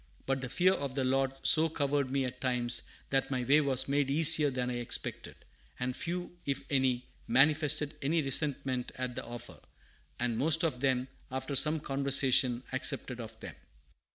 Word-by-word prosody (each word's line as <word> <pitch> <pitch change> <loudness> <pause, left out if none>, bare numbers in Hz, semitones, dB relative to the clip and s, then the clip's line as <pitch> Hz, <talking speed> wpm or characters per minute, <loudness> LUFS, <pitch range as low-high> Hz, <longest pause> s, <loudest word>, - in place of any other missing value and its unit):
But 135 0 -1
the 125 - -5
fear 185 +7 +3
of 140 -6 -4
the 135 - 0
Lord 135 +1 +1
so 160 +1 +5
covered 140 -3 -1
me 135 0 0
at 125 0 -7
times 125 -2 +1 0.3
that 135 0 +1
my 130 -2 -2
way 140 +5 +4
was 135 -3 0
made 140 0 0
easier 155 0 +6
than 125 -1 -3
I 120 - -3
expected; 120 -1 -2 0.4
and 125 0 -2
few, 175 0 -5
if 140 -1 -3
any, 130 -2 +1 0.2
manifested 150 +3 +2
any 155 +3 0
resentment 135 -2 -1
at 125 -1 -4
the - - -5
offer, 120 0 -9 0.6
and 120 -2 -1
most 160 +4 +3
of 150 -7 -1
them, 130 -1 0 0.2
after 130 +2 -4
some 150 +3 +3
conversation, 135 -3 +1
accepted 130 -1 -2
of 110 -1 -9
them." - - -8
135 Hz, 170 wpm, -31 LUFS, 125-145 Hz, 0.6 s, easier